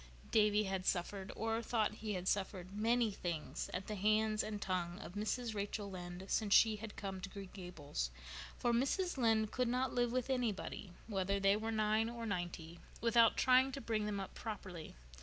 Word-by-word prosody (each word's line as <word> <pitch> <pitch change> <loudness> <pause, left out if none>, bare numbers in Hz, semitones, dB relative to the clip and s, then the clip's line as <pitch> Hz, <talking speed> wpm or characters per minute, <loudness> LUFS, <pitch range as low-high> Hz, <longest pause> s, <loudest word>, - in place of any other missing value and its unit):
Davy 210 -1 +4
had 190 -2 -2
suffered, 190 +2 -1
or 225 +1 0
thought 220 -2 0
he 215 -1 -2
had 180 0 -4
suffered, 190 -2 -1
many 225 +2 +2
things 170 -5 -4
at 185 +1 -3
the 215 - -4
hands 215 +1 +2
and 210 -1 -3
tongue 180 -3 -2
of 180 - -8
Mrs. 220 +3 -1
Rachel 205 0 -3
Lynde 180 0 -6
since 205 -1 +3
she 220 -2 +6
had 215 0 -7
come 190 -2 -5
to 195 - -5
Green 195 -1 -8
Gables, 155 - -4 0.5
for 240 - +1
Mrs. 285 +9 +1
Lynde 220 -3 +3
could 250 -1 +1
not 255 +2 0
live 240 -1 +2
with 255 +1 0
anybody, 220 -6 -2
whether 200 -2 0
they 195 0 +5
were 220 +1 -2
nine 215 +1 +2
or 235 -1 -5
ninety, 175 -4 -4 0.2
without 230 0 +5
trying 260 +1 +5
to 275 - -3
bring 220 -5 -1
them 205 -1 -2
up 195 - -6
properly. 190 -7 -6
210 Hz, 185 wpm, -37 LUFS, 190-225 Hz, 0.5 s, she